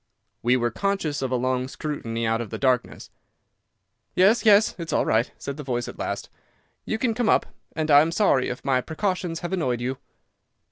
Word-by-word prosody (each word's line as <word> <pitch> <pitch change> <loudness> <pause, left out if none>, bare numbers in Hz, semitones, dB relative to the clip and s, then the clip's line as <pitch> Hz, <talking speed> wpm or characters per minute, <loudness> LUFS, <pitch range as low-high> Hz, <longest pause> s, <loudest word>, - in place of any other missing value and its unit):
We 125 +2 +3
were 120 -1 0
conscious 195 - -1
of 130 - -1
a 130 - 0
long 130 +1 0
scrutiny 115 -6 -4
out 115 +1 +1
of 115 - -6
the - - -5
darkness. 130 -2 -1 1.0
"Yes, 205 +6 +4
yes, 210 +1 +6
it's 165 -1 -5
all - - +2
right," 110 +2 +1
said 140 0 -6
the 150 - -6
voice 120 -3 -2
at - - -9
last. - - -3 0.6
"You 220 - -1
can 230 0 0
come 235 -1 0
up, - - +4 0.3
and 155 -1 -1
I 145 0 +9
am 160 +2 +1
sorry 165 -9 +2
if 125 - -6
my 130 -2 +2
precautions 175 +1 -2
have 175 +2 -4
annoyed 130 -10 0
you." 130 +2 -3
140 Hz, 195 wpm, -24 LUFS, 125-180 Hz, 1.0 s, I